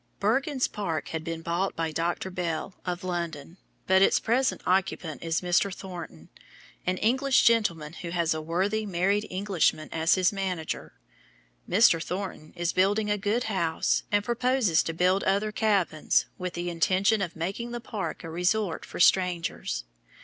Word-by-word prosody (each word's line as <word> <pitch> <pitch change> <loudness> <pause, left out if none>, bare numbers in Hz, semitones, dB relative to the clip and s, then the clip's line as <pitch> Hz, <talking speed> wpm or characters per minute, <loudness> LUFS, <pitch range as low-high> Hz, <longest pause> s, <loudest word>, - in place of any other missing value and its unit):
Bergens 260 +6 +1
Park 160 -9 -3
had 160 -1 -4
been 165 0 -5
bought 175 +4 -1
by 165 -1 -2
Dr. 170 +4 -2
Bell, 175 0 -3
of 180 +1 -3
London, 170 -2 -4 0.3
but 190 0 +4
its - - +5
present 255 +4 +1
occupant 185 -4 0
is 165 0 -1
Mr. 180 +2 +2
Thornton, 175 - -9 0.6
an 185 0 +1
English 260 +6 +3
gentleman, 170 -10 +2
who 170 - -7
has 170 -2 +1
a 155 - -4
worthy 190 +7 0
married 200 +2 0
Englishman 185 -5 0
as 160 0 +3
his 185 +1 +2
manager. 185 -5 -3 0.8
Mr. 180 -3 +5
Thornton 180 -5 -5
is 175 0 -1
building 205 +3 +2
a 205 - +2
good 215 +4 0
house, 170 -7 0
and 205 0 +2
purposes 240 -6 +2
to 165 - -3
build 185 +3 +2
other 200 +2 +1
cabins, 200 -8 +1
with 180 -1 -4
the 175 0 -3
intention 190 +5 +2
of 175 -3 -3
making 195 +8 -3
the 240 0 -4
park 215 -6 -5
a 165 - -6
resort 180 +2 0
for - - -8
strangers. 175 - +2
185 Hz, 155 wpm, -27 LUFS, 165-205 Hz, 0.8 s, its